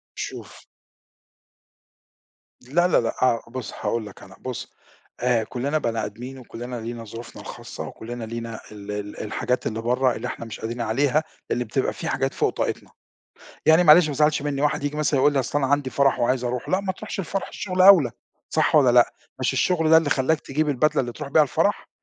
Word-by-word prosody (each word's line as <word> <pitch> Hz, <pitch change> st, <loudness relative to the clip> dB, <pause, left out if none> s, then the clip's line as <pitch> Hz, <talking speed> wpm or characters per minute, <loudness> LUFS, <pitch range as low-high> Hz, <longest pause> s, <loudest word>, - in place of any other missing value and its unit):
شوف. -, -, -7 dB, 2.0 s
لا، 165 Hz, +8 st, +2 dB
لا، -, -, +3 dB
لأ، 115 Hz, -, -2 dB
آآ، 115 Hz, -3 st, +3 dB
بُص 125 Hz, -1 st, -6 dB
هاقول 115 Hz, -2 st, -2 dB
لك 100 Hz, -, -12 dB
أنا، 95 Hz, -, -14 dB
بُص 130 Hz, -2 st, -7 dB, 0.4 s
آآ، 120 Hz, -2 st, +2 dB
كُلّنا 135 Hz, +7 st, -2 dB
بني 115 Hz, -6 st, -1 dB
آدمين 125 Hz, +5 st, -8 dB
وكُلّنا 120 Hz, 0 st, -7 dB
لينا 115 Hz, 0 st, -6 dB
ظروفنا 115 Hz, +2 st, -9 dB
الخاصة -, -, -8 dB
وكُلّنا 120 Hz, +1 st, -7 dB
لينا 115 Hz, 0 st, -6 dB
ال 105 Hz, -1 st, -8 dB
ال 105 Hz, 0 st, -5 dB
الحاجات 125 Hz, +4 st, -1 dB
اللي 110 Hz, 0 st, -3 dB
بره 125 Hz, +2 st, +1 dB
اللي 125 Hz, -, -4 dB
إحنا 115 Hz, -, -6 dB
مش 115 Hz, -, -8 dB
قادرين 120 Hz, +2 st, -4 dB
عليها 135 Hz, +7 st, +1 dB, 0.3 s
اللي 125 Hz, -, +1 dB
بتبقى 110 Hz, -, -1 dB
في -, -, -6 dB
حاجات -, -, -1 dB
فوق -, -, +1 dB
طاقتنا، -, -, -3 dB, 0.7 s
يعني 160 Hz, +3 st, +6 dB
معلش 155 Hz, +1 st, +8 dB
ما 150 Hz, -, -3 dB
تزعلش 150 Hz, +1 st, +2 dB
مِنّي 145 Hz, -1 st, -2 dB
واحد 145 Hz, -1 st, +1 dB
ييجي 145 Hz, +1 st, -2 dB
مثلًا 150 Hz, -2 st, +1 dB
يقول 145 Hz, +2 st, +4 dB
لي 135 Hz, -, +2 dB
أصل 135 Hz, +3 st, -1 dB
أنا 135 Hz, -, +1 dB
عندي 145 Hz, -1 st, +1 dB
فرح 135 Hz, +1 st, +2 dB
وعايز 125 Hz, +1 st, +1 dB
أروح، 125 Hz, 0 st, -3 dB
لأ 185 Hz, -, +2 dB
ما 190 Hz, -2 st, -2 dB
تروحش 210 Hz, +1 st, -7 dB
الفرح 195 Hz, +1 st, -3 dB
الشغل 185 Hz, -2 st, -2 dB
أولى 185 Hz, -8 st, +8 dB, 0.4 s
صح -, -, +2 dB
والّا -, -, +6 dB
لأ، -, -, +5 dB, 0.3 s
مش -, -, 0 dB
الشغل 165 Hz, -3 st, +2 dB
ده 160 Hz, -, +8 dB
اللي 160 Hz, -3 st, +2 dB
خلّاك 145 Hz, +3 st, +2 dB
تجيب 150 Hz, +2 st, -1 dB
البدلة 145 Hz, +2 st, +2 dB
اللي 120 Hz, -2 st, -4 dB
تروح 145 Hz, +2 st, -7 dB
بيها 155 Hz, +2 st, +5 dB
الفرح، 165 Hz, +9 st, 0 dB
130 Hz, 195 wpm, -24 LUFS, 115-150 Hz, 2.0 s, معلش